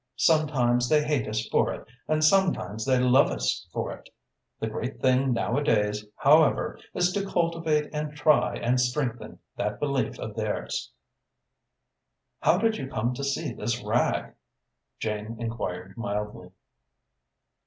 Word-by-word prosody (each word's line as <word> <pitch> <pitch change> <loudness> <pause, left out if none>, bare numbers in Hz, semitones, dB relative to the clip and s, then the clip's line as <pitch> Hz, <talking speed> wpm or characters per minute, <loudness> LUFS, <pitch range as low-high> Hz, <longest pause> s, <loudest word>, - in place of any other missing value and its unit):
Sometimes 125 -5 +2
they 150 -1 +4
hate 150 -6 0
us 110 +1 -2
for - - +2
it - - -8 0.2
and 155 0 +1
sometimes 155 - +2
they 130 -1 +3
love 125 +2 +5
us - - -2
for - - -3
it. - - -14 0.5
The - - -2
great 115 +3 -4
thing, 130 0 +3
nowadays, 115 -4 +1
however, 150 +2 +3 0.2
is 180 0 +2
to 200 +2 -1
cultivate 165 -5 0
and 150 0 -4
try 150 0 +3
and 125 +1 +1
strengthen 125 -2 -2 0.2
that 105 +1 -2
belief 140 -5 -1
of 110 - -6
theirs." 110 -2 -3 1.5
"How 175 - +4
did 225 +2 +1
you 135 - -5
come 120 0 -1
to 140 - -5
see 140 -1 -2
this 120 +3 -3
rag?" - - 0 0.6
Jane 110 +1 -4
enquired 95 -5 -4
mildly. 105 -4 -4
125 Hz, 135 wpm, -27 LUFS, 110-150 Hz, 1.5 s, love